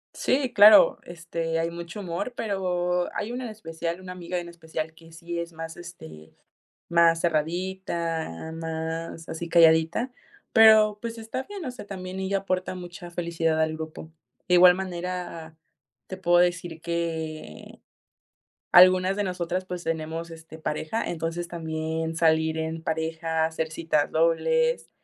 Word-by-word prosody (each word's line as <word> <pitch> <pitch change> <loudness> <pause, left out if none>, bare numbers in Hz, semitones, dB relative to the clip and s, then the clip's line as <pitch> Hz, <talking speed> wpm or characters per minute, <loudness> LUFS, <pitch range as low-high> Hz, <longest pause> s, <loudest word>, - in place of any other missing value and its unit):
Sí, 260 -1 0
claro, 210 +1 +8
este, 165 -1 -4
hay 165 +1 -1
mucho 170 +4 -7
humor, 185 +7 -4
pero 180 -4 -1
hay 215 +3 -3
una 250 +1 -4
en - - -5
especial, 170 -4 -5
una 185 -1 -9
amiga 180 0 -5
en 175 - -7
especial 160 -2 -6
que 165 0 -17
sí 170 +1 -6
es 170 0 -5
más, 165 0 -7
este, 80 - -11 0.6
más 170 -1 +4
cerradita, 165 - -2
más 165 0 -5
así 165 +1 -5
calladita, 165 +8 +4 0.4
pero, 220 -2 +7
pues, 230 0 -6
está 225 +4 -4
bien, 400 +3 -8
o 255 - -2
sea, 250 -4 -9
también 185 -1 -6
ella 195 +1 0
aporta 185 -1 -2
mucha 175 -1 -9
felicidad 165 -2 0
al 160 0 +1
grupo. 160 0 -8 0.4
De 180 - +4
igual 180 0 +8
manera, 180 -3 -5 0.5
te 185 - -6
puedo 175 -1 +3
decir 175 -2 0
que 160 - -5 0.9
algunas 185 +2 +6
de 205 - +1
nosotras, 180 0 -2
pues, 180 -2 -6
tenemos, 165 +1 -3
este, 160 0 -11
pareja, 155 +8 -2
entonces 170 +1 -4
también 160 -1 -3
salir 160 -1 +2
en 160 0 -3
pareja, 160 0 -1
hacer 160 0 -3
citas 160 -2 0
dobles, 480 - +2
170 Hz, 145 wpm, -26 LUFS, 160-185 Hz, 0.9 s, claro